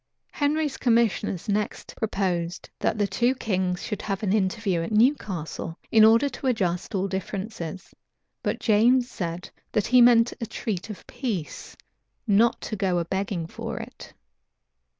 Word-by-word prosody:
Henry's 295 0 0
commissioners 225 -6 +1
next 210 0 -2
proposed, 185 -5 -2
that - - 0
the 205 - +2
two 240 +5 +1
kings 185 -6 -1
should 210 -3 -4
have 195 0 -3
an 195 -2 +1
interview 195 -3 0
at 165 - -4
Newcastle, 200 - 0
in 220 -1 +7
order 230 +5 +6
to 275 - -5
adjust 190 -5 -1
all 195 +1 0
differences; 190 -2 -5 0.5
but - - -2
James 240 +3 +4
said, 175 -4 -5 0.2
that 210 - +1
he 250 +1 +5
meant 240 -1 +6
to 230 - -4
treat 210 -2 -4
of 210 - -7
a - - -23
peace, 230 - -5 0.5
not 225 +2 +3
to 215 - -4
go 190 -3 0
a 170 - 0
begging 190 -1 -2
for - - -6
it. - - -9
205 Hz, 150 wpm, -25 LUFS, 185-230 Hz, 0.5 s, in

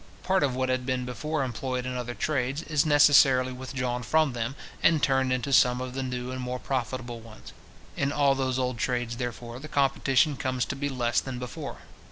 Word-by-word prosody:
Part 190 0 +2
of 130 -3 +1
what 130 0 0
had 130 0 0 0.2
before 150 +5 -3
been - - +1
employed 125 +1 -3
in 125 0 -3
other 120 -1 -4
trades, 140 0 -1
is 155 -2 +1
necessarily 135 -3 +5
withdrawn 125 -1 -3
from 155 +4 +2
them, 120 +2 -3 0.3
and 165 - +5
turned 130 -2 +2
into 130 +2 -1
some 125 -1 +5
of 130 0 -5
the 135 - -3
new 125 -1 -4
and 130 0 -4
more 125 0 -3
profitable 125 -2 -3
ones. 110 -1 -13 0.4
In 140 0 0
all 140 -1 +3
those 130 -1 -1
old 125 -2 -1
trades, 120 -1 -1
therefore, 120 -1 -5
the 150 - -8
competition 140 0 +2
comes 130 -1 -1
to - - -4
be 145 +1 -2
less 120 -3 +1
than 130 -2 -6
before. 125 -2 -7
130 Hz, 200 wpm, -27 LUFS, 125-135 Hz, 0.4 s, necessarily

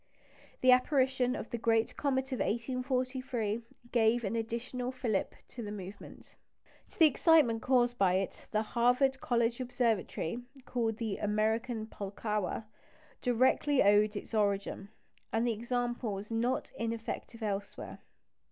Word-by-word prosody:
The 255 - +6
apparition 255 -1 +3
of - - -6
the 235 - -3
great 225 0 +2
comet 265 -1 -1
of 255 - -2
1843 255 -1 -1 0.3
gave 235 0 +3
an 215 +2 -1
additional 235 +2 -3
fillip 235 -6 -1
to 240 - -8
the 210 -2 -5
movement. 195 -1 -10 0.5
To - - -20
the 325 - +8
excitement 295 -6 +4
caused 245 -1 +2
by 190 -2 +4
it 190 0 -3
the 215 0 +1
Harvard 250 +4 +2
College 235 0 +1
Observatory 235 -5 -1 0.3
called 225 -3 -1
the 225 -4 -2
"American 220 +2 0
Pulkowa" 210 0 -3 0.6
directly 260 +3 +3
owed 205 +1 +4
its 205 - -7
origin; 200 -1 0 0.4
and 225 +1 +1
the 235 - +2
example 240 0 -2
was 200 +3 -7
not 235 +3 0
ineffective 230 0 -4
elsewhere. 205 -1 -4
235 Hz, 130 wpm, -32 LUFS, 215-250 Hz, 0.6 s, the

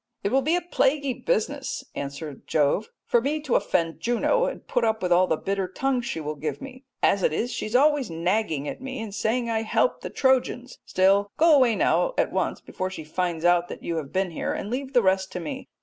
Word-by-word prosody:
"It 200 - 0
will 270 - +3
be 310 +6 +2
a 355 - 0
plaguy 285 -5 +1
business," - - -2
answers 140 +1 -6
Jove, 155 +8 +1 0.2
"for 240 - +3
me 290 +5 -1
to 290 -5 -2
offend 165 -1 +1
Juno 245 - +1
and - - -5
put 245 - 0
up 220 -2 0
with 180 - 0
all 180 +1 +5
the 160 - +1
bitter 195 +1 -2
tongue 255 +7 -1
she 235 - -4
will 150 -1 -3
give 150 +1 -4
me. 270 -1 -10 0.2
As 200 - +3
it - - +2
is, 230 +10 -1
she - - -3
is 215 - -4
always 285 -2 +4
nagging 165 -3 -1
at - - -6
me 265 0 -5
and 220 -3 -6
saying 235 +3 0
I 225 -1 0
help 225 - +1
the - - -5
Trojans, 255 -1 0
still, 195 +2 +3
go 325 -1 +6
away 250 -5 +4
now - - +2
at - - +1
once - - -1
before 185 0 -4
she 185 -4 -7
finds 170 +1 -2
out 175 0 +4
that - - -9
you 170 - -2
have 145 -4 -5
been 190 -1 0
here, - - -2
and 205 - -5
leave 270 +2 -3
the 245 - +4
rest 190 0 +1
to - - -3
me. 265 - -6
220 Hz, 230 wpm, -25 LUFS, 175-265 Hz, 0.2 s, go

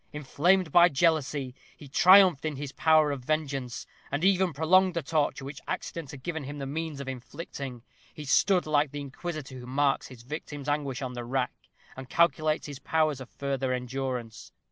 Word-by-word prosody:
Inflamed 160 +5 +1
by 175 0 +7
jealousy, 145 -4 +1 0.2
he 145 - -12
triumphed 180 +1 +6
in 155 -2 -2
his 140 0 -6
power 155 -1 +4
of 135 -3 -5
vengeance, 140 -4 -2 0.3
and 145 +3 -2
even 190 -1 +3
prolonged 180 +5 +3
the 170 - -1
torture 145 -2 0
which 140 0 -8
accident 165 -5 -4
had 135 -1 -10
given 160 -2 -3
him 145 +2 -6
the 140 - -4
means 155 +1 -4
of 140 - -6
inflicting. 135 -1 -7 0.3
He 150 - -9
stood 180 +7 +3
like 150 -1 +2
the 145 +1 -6
inquisitor 140 -1 -6
who 125 - -10
marks 135 +1 +1
his 120 -3 -13
victim's 145 +1 -7
anguish 145 -3 -1
on 125 -1 -4
the 120 -1 -5
rack, 125 +1 -1 0.4
and 130 -1 -9
calculates 155 -2 +2
his 145 -3 -7
powers 155 -4 0
of 130 - -9
further 135 -2 -2
endurance. 125 -2 -4
145 Hz, 180 wpm, -28 LUFS, 135-160 Hz, 0.4 s, by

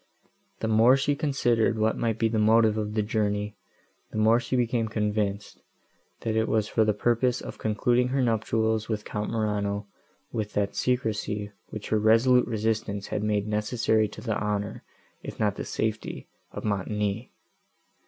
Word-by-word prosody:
—The 110 - 0
more 115 +4 +5
she 145 +1 +1
considered 120 -7 +1
what 110 +1 +2
might 115 -2 -1
be 115 - +2
the 110 0 0
motive 110 0 +4
of 105 -1 -3
the 110 - +2
journey, 105 -1 -1 0.5
the - - -7
more 110 +2 +4
she 125 - -3
became 120 -2 +1
convinced, 105 -2 -2 0.6
that 110 -1 -1
it 110 0 +2
was 110 -2 +1
for 110 - +2
the 110 - +3
purpose 120 +3 +1
of - - -8
concluding 120 +3 +1
her 135 +2 -1
nuptials 110 -1 0
with 105 -2 -2
Count 105 0 -3
Morano, 105 -2 -1 0.5
with 110 -2 -3
that 100 -1 0
secrecy, 105 -4 -1 0.2
which 110 - -7
her 110 - +2
resolute 115 +4 +4
resistance 110 -3 -2
had - - -2
made 105 -1 0
necessary 110 +1 +1
to 105 - -11
the 110 -3 -1
honour, 105 0 -2 0.4
if - - -8
not 105 -2 +1
to - - -4
the - - -4
safety, 110 0 -3 0.2
of - - -7
Montoni. 105 +2 -2
110 Hz, 165 wpm, -27 LUFS, 105-115 Hz, 0.6 s, more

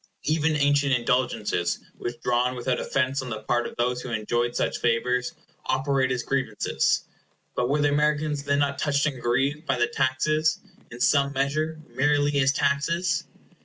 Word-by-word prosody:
Even 155 0 +1
ancient 145 -1 +2
indulgences, 120 -7 0 0.2
withdrawn 120 +1 -1
without 125 0 -1
offence 135 0 0
on 130 - -6
the 110 -2 -5
part 120 +2 0
of - - -10
those 125 +1 0
who 130 - -7
enjoyed 120 +2 -1
such - - -1
favors, 125 +1 0 0.3
operate 130 0 +1
as 125 -2 -1
grievances. 130 -6 0 0.5
But 125 0 0
were 145 +2 +2
the 145 - +4
Americans 150 0 +1
then 140 0 0
not 140 -1 0
touched 145 -1 +1
and 135 -5 -2
grieved 135 +6 0
by 135 - +1
the 120 - +3
taxes, 155 +6 +1 0.3
in 120 - -10
some 140 -1 +3
measure, 155 +4 -1
merely 145 +3 +2
as 135 -1 +4
taxes? 155 +6 0
135 Hz, 160 wpm, -25 LUFS, 125-145 Hz, 0.5 s, the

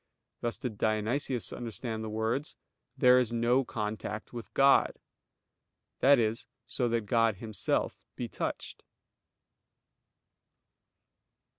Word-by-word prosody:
Thus 120 -1 -2
did 115 -5 -5
Dionysius 110 +3 0
understand 115 -1 -5
the 110 - -4
words, 110 +7 -1 0.4
"There 125 -1 +6
is 120 -3 0
no 120 +3 +2
contact 110 -1 -4
with 120 -1 -7
God"; 140 0 +5 1.0
that 140 +1 +6
is, 115 0 0 0.2
so 120 -2 -1
that 115 0 +1
God 115 -1 +3
Himself 110 0 -2
be - - -4
touched. - - -5
115 Hz, 105 wpm, -30 LUFS, 110-125 Hz, 1.0 s, There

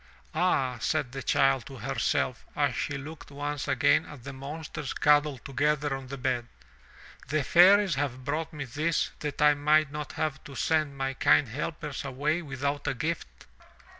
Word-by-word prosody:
"Ah," 130 -9 +1
said 145 0 0
the 135 +1 -5
child 135 -1 +2
to 135 - -9
herself - - -1
as - - +1
she 145 - -2
looked 145 +1 -9
once 145 0 -4
again 135 -3 +3
at 140 -5 -11
the 140 - -7
monsters 145 +1 -6
cuddled 145 -3 +3
together 145 +1 0
on 135 -1 -8
the 140 +2 -6
bed. 125 -2 -1 0.8
"The 155 0 0
fairies 190 +5 +6
have 130 -2 -3
brought 155 +3 -2
me 150 -3 -5
this 155 +6 0
that 150 -1 -2
I 150 0 +7
might 150 0 +3
not 150 0 -5
have 155 -3 -2
to 140 -3 -10
send 150 +1 0
my 135 0 -1
kind 135 -1 +4
helpers 150 +2 -4
away 145 +5 -1
without 140 -1 -3
a 140 - 0
gift. 125 - -4
145 Hz, 165 wpm, -28 LUFS, 135-150 Hz, 0.8 s, I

